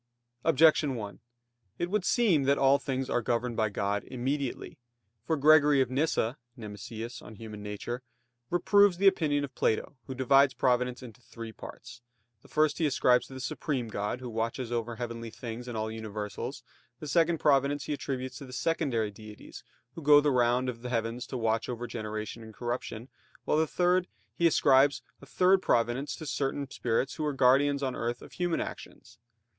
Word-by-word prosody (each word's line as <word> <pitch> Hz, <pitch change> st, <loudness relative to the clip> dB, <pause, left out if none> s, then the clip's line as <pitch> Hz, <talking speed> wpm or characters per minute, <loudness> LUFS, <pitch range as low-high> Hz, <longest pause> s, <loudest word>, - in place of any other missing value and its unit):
Objection 150 Hz, -2 st, +4 dB
1: 100 Hz, -5 st, -6 dB, 0.6 s
It 175 Hz, +1 st, -2 dB
would 210 Hz, -2 st, +1 dB
seem 185 Hz, -, +3 dB
that 140 Hz, +1 st, +3 dB
all 135 Hz, +1 st, +4 dB
things 135 Hz, -2 st, -3 dB
are 120 Hz, -, 0 dB
governed 120 Hz, +1 st, -1 dB
by 110 Hz, -1 st, +1 dB
God 100 Hz, 0 st, -1 dB
immediately. 130 Hz, +1 st, -3 dB, 0.5 s
For 160 Hz, -, +1 dB
Gregory 150 Hz, -1 st, +6 dB
of 130 Hz, -1 st, +1 dB
Nyssa 135 Hz, -3 st, 0 dB, 0.2 s
(Nemesius, 110 Hz, +2 st, -7 dB
De -, -, -12 dB, 0.2 s
Nat. 105 Hz, -1 st, -7 dB
Hom.) 120 Hz, +1 st, -3 dB, 0.5 s
reproves 200 Hz, +1 st, +4 dB
the 195 Hz, -, 0 dB
opinion 155 Hz, -7 st, +3 dB
of 140 Hz, -, -6 dB
Plato 110 Hz, +5 st, -1 dB
who 130 Hz, -, -5 dB
divides 135 Hz, +1 st, +4 dB
providence 125 Hz, 0 st, +1 dB
into 120 Hz, -1 st, -12 dB
three 115 Hz, -2 st, -9 dB
parts. 120 Hz, +2 st, -11 dB, 0.4 s
The -, -, -18 dB
first 155 Hz, -1 st, +1 dB
he 160 Hz, -, +3 dB
ascribes 125 Hz, -3 st, +3 dB
to 135 Hz, -, -11 dB
the -, -, -7 dB
supreme 130 Hz, -1 st, -3 dB
god, 105 Hz, +4 st, -3 dB
who 125 Hz, -, -6 dB
watches 115 Hz, +2 st, -3 dB
over 120 Hz, -1 st, -2 dB
heavenly 115 Hz, -1 st, -5 dB
things 120 Hz, +1 st, -7 dB
and 120 Hz, -2 st, -5 dB
all 110 Hz, 0 st, -2 dB
universals; 110 Hz, +3 st, -6 dB, 0.4 s
the -, -, -7 dB
second 165 Hz, +2 st, +2 dB
providence 140 Hz, -1 st, +2 dB
he -, -, -3 dB
attributes 130 Hz, -2 st, -4 dB
to 140 Hz, -, -8 dB
the 125 Hz, -, -11 dB
secondary 125 Hz, -8 st, 0 dB
deities, 105 Hz, +1 st, -12 dB, 0.3 s
who 165 Hz, -, -8 dB
go 145 Hz, 0 st, +7 dB
the 145 Hz, 0 st, +2 dB
round 125 Hz, 0 st, +2 dB
of 120 Hz, -2 st, -4 dB
the 125 Hz, -, -5 dB
heavens 115 Hz, +1 st, -2 dB
to 130 Hz, -, -4 dB
watch 115 Hz, 0 st, 0 dB
over 120 Hz, -1 st, -4 dB
generation 110 Hz, -1 st, -5 dB
and 110 Hz, -1 st, -12 dB
corruption; 120 Hz, -1 st, -4 dB, 0.4 s
while -, -, +2 dB, 0.8 s
he 170 Hz, -, +5 dB
ascribes 140 Hz, -2 st, +4 dB, 0.2 s
a -, -, -13 dB
third 185 Hz, +1 st, +3 dB
providence 125 Hz, +4 st, 0 dB
to 160 Hz, -, -8 dB
certain 140 Hz, 0 st, -2 dB
spirits 120 Hz, +3 st, -1 dB
who 155 Hz, -, -2 dB
are 150 Hz, -1 st, 0 dB
guardians 135 Hz, +2 st, +3 dB
on 130 Hz, -2 st, -1 dB
earth 120 Hz, +1 st, -3 dB
of -, -, -13 dB
human 175 Hz, -2 st, -1 dB
actions. 110 Hz, +1 st, -8 dB
125 Hz, 175 wpm, -29 LUFS, 115-145 Hz, 0.8 s, go